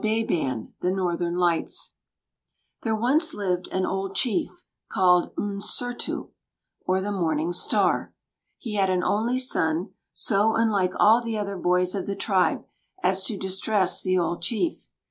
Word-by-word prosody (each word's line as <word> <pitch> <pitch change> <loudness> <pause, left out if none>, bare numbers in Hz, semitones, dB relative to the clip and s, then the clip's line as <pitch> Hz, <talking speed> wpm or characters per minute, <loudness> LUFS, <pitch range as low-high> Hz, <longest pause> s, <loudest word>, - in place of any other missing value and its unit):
WAWBĀBAN, 215 - -1
THE 180 - +1
NORTHERN 175 -2 -1
LIGHTS 175 -2 0 0.9
There 220 -1 0
once 295 +9 +2
lived 185 -3 -1
an 185 0 -1
old 195 0 -3
chief, 310 - -1 0.2
called 180 -1 +3
"M'Sūrtū," 205 +4 -3 0.6
or 185 +1 +2
the 200 +2 -3
Morning 165 -3 0
Star. 175 - +1 0.5
He 225 -4 -6
had 195 -2 +2
an 185 -1 +1
only 230 +4 +1
son, 175 -8 0 0.2
so 215 +2 +2
unlike 205 -5 +2
all 225 +3 +6
the 230 -2 -3
other 200 -1 -3
boys 180 0 +1
of 200 - -3
the 200 - -2
tribe 185 -5 +1 0.4
as 190 +1 +2
to 200 +2 -3
distress 190 +1 0
the 185 -1 +1
old 175 0 -1
chief. 235 - -2
195 Hz, 145 wpm, -25 LUFS, 180-220 Hz, 0.9 s, all